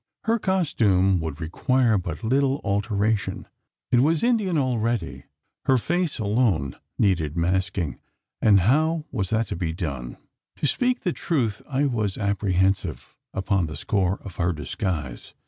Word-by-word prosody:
Her 230 Hz, +1 st, +1 dB
costume 105 Hz, -, +2 dB
would 80 Hz, -2 st, -4 dB
require 115 Hz, -, +1 dB
but 85 Hz, 0 st, -5 dB
little 135 Hz, +4 st, +2 dB
alteration: 105 Hz, +1 st, 0 dB, 0.5 s
it 120 Hz, -, +5 dB
was 155 Hz, -, +3 dB
Indian 215 Hz, -8 st, +2 dB
already. 115 Hz, -, -1 dB, 0.4 s
Her 130 Hz, -, +4 dB
face 175 Hz, +5 st, -1 dB
alone 105 Hz, -, +1 dB, 0.2 s
needed 85 Hz, -6 st, +1 dB
masking 90 Hz, -4 st, 0 dB, 0.4 s
and 100 Hz, -3 st, +5 dB
how 155 Hz, -, +2 dB
was 95 Hz, -7 st, -2 dB
that 110 Hz, +1 st, +1 dB
to -, -, -2 dB
be 85 Hz, -1 st, -2 dB
done? 70 Hz, -8 st, -5 dB, 0.4 s
To -, -, -3 dB
speak 250 Hz, -, +1 dB
the 180 Hz, -, 0 dB
truth, 120 Hz, -, -1 dB
I 140 Hz, +1 st, +1 dB
was 110 Hz, -7 st, -1 dB
apprehensive 95 Hz, -4 st, 0 dB, 0.2 s
upon 95 Hz, -2 st, 0 dB
the 80 Hz, -, -6 dB
score 95 Hz, -2 st, 0 dB
of 95 Hz, -3 st, -9 dB
her 90 Hz, 0 st, +1 dB
disguise. 75 Hz, -2 st, -4 dB
100 Hz, 140 wpm, -24 LUFS, 90-130 Hz, 0.5 s, it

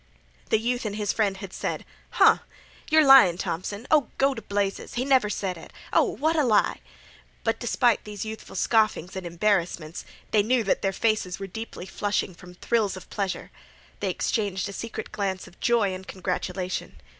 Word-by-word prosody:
'" -, -, -31 dB
The -, -, +4 dB
youth 245 Hz, +3 st, -1 dB
and 210 Hz, -2 st, -3 dB
his 210 Hz, -1 st, -1 dB
friend 200 Hz, -3 st, +1 dB
had 195 Hz, -1 st, -8 dB
said: -, -, -3 dB, 0.2 s
"Huh!" -, -, +5 dB, 0.5 s
"Yer 315 Hz, -1 st, +6 dB
lyin' 265 Hz, -11 st, +8 dB
Thompson." 200 Hz, +7 st, -4 dB
"Oh, 300 Hz, -5 st, +4 dB
go 275 Hz, 0 st, +3 dB
t' -, -, -7 dB
blazes!" 200 Hz, -1 st, -2 dB
"He 245 Hz, +2 st, 0 dB
never 260 Hz, -6 st, +4 dB
sed 185 Hz, -4 st, -3 dB
it." -, -, -12 dB, 0.2 s
"Oh, -, -, +6 dB
what 315 Hz, +3 st, 0 dB
a 305 Hz, -, +3 dB
lie!" 220 Hz, -5 st, +2 dB
"Huh!" -, -, -24 dB
But -, -, 0 dB
despite 240 Hz, -4 st, +2 dB
these 210 Hz, 0 st, -6 dB
youthful 220 Hz, 0 st, -8 dB
scoffings 215 Hz, -6 st, +1 dB
and 190 Hz, -2 st, -4 dB
embarrassments, 170 Hz, -3 st, 0 dB, 0.3 s
they 215 Hz, -, +5 dB
knew 235 Hz, +3 st, +2 dB
that 195 Hz, -, +1 dB
their 195 Hz, -, +1 dB
faces 215 Hz, -3 st, 0 dB
were 195 Hz, -, -5 dB
deeply 210 Hz, -1 st, -7 dB
flushing 205 Hz, -1 st, -1 dB
from 180 Hz, +1 st, -14 dB
thrills 210 Hz, -1 st, 0 dB
of 185 Hz, -, -12 dB
pleasure. 195 Hz, -3 st, -3 dB, 0.5 s
They 200 Hz, -, -1 dB
exchanged 195 Hz, 0 st, -1 dB
a -, -, -7 dB
secret 220 Hz, +1 st, -6 dB
glance 195 Hz, -3 st, -2 dB
of 175 Hz, -, -18 dB
joy 225 Hz, -5 st, +2 dB
and 185 Hz, +1 st, -8 dB
congratulation. 185 Hz, 0 st, -3 dB
205 Hz, 185 wpm, -26 LUFS, 185-225 Hz, 0.5 s, lyin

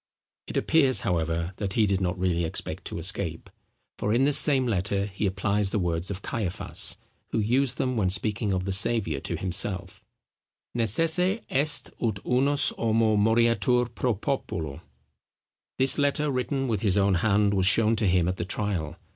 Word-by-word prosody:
It -, -, -5 dB
appears, 140 Hz, -5 st, +3 dB
however, 85 Hz, 0 st, -2 dB
that 100 Hz, -2 st, -4 dB
he 110 Hz, 0 st, +2 dB
did 100 Hz, -1 st, -1 dB
not 90 Hz, 0 st, -2 dB
really 90 Hz, -2 st, -1 dB
expect 80 Hz, -, -4 dB
to -, -, -5 dB
escape; 85 Hz, -1 st, -2 dB, 0.5 s
for 105 Hz, -, -1 dB
in 125 Hz, -, +2 dB
this 145 Hz, 0 st, +7 dB
same 135 Hz, -4 st, +4 dB
letter 100 Hz, -2 st, -1 dB
he 100 Hz, 0 st, -3 dB
applies 100 Hz, +1 st, -1 dB
the 105 Hz, -, -2 dB
words 85 Hz, -2 st, -2 dB
of 100 Hz, -1 st, -6 dB
Caiaphas, 100 Hz, -7 st, -2 dB, 0.3 s
who -, -, -3 dB
used 125 Hz, +5 st, 0 dB
them 130 Hz, -1 st, -1 dB
when 95 Hz, -4 st, +1 dB
speaking 100 Hz, +2 st, 0 dB
of 90 Hz, -1 st, -2 dB
the 95 Hz, -, -3 dB
Saviour, 95 Hz, -6 st, +2 dB
to -, -, -4 dB
himself, 95 Hz, 0 st, -2 dB, 0.7 s
Necesse 165 Hz, -, +3 dB
est 145 Hz, +2 st, +1 dB
ut 110 Hz, -4 st, -1 dB
unus 140 Hz, +3 st, +3 dB
homo 110 Hz, -1 st, +1 dB
moriatur 115 Hz, +3 st, +1 dB
pro 120 Hz, -1 st, -1 dB
populo. 85 Hz, -, -4 dB, 1.0 s
This 130 Hz, +3 st, +2 dB
letter, 145 Hz, +1 st, 0 dB
written 135 Hz, +1 st, -2 dB
with 110 Hz, -5 st, -2 dB
his 100 Hz, -3 st, 0 dB
own 100 Hz, -1 st, +2 dB
hand, 100 Hz, +2 st, +1 dB
was 95 Hz, -2 st, +2 dB
shown 110 Hz, +3 st, +4 dB
to 105 Hz, -2 st, 0 dB
him 90 Hz, -2 st, +2 dB
at 95 Hz, +1 st, -2 dB
the -, -, -3 dB
trial. 90 Hz, -6 st, -4 dB
105 Hz, 170 wpm, -25 LUFS, 95-125 Hz, 1.0 s, this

